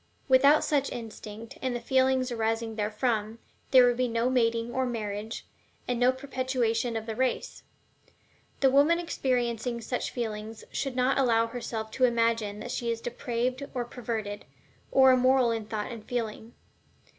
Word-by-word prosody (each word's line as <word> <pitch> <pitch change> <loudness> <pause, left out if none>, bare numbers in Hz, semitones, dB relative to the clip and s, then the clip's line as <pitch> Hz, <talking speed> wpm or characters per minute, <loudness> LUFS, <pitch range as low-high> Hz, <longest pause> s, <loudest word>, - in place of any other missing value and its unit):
Without 280 +3 +6
such 280 -2 +1
instinct 220 -1 -8
and 255 -2 -1
the - - -2
feelings 260 -1 +2
arising 225 -1 -1
therefrom, 215 +1 -1 0.3
there 255 -2 +7
would 245 -1 +2
be 255 0 +1
no 230 +2 0
mating 230 -1 +1
or 260 - +1
marriage, 220 -3 -4 0.4
and 245 -1 -1
no 250 +1 +5
perpetuation 255 -3 -1
of 220 - -5
the 225 -1 -4
race. 255 +1 -1 1.0
The 270 -1 +5
woman 290 +5 +5
experiencing 245 -7 -1
such 245 +2 -3
feelings 220 -2 -5
should 270 -2 -3
not 255 +2 +2
allow 230 -3 +3
herself 225 -2 -5
to 255 +3 +3
imagine 230 -3 +1
that - - -6
she 235 - -2
is 230 -1 -1
depraved 245 +2 -2
or 245 -1 -1
perverted, 225 -4 -5 0.5
or 265 -1 +7
immoral 255 -1 +4
in 225 -2 -3
thought 215 +1 -3
and 230 -3 -8
feeling. 225 -1 -4
240 Hz, 155 wpm, -28 LUFS, 225-255 Hz, 1.0 s, there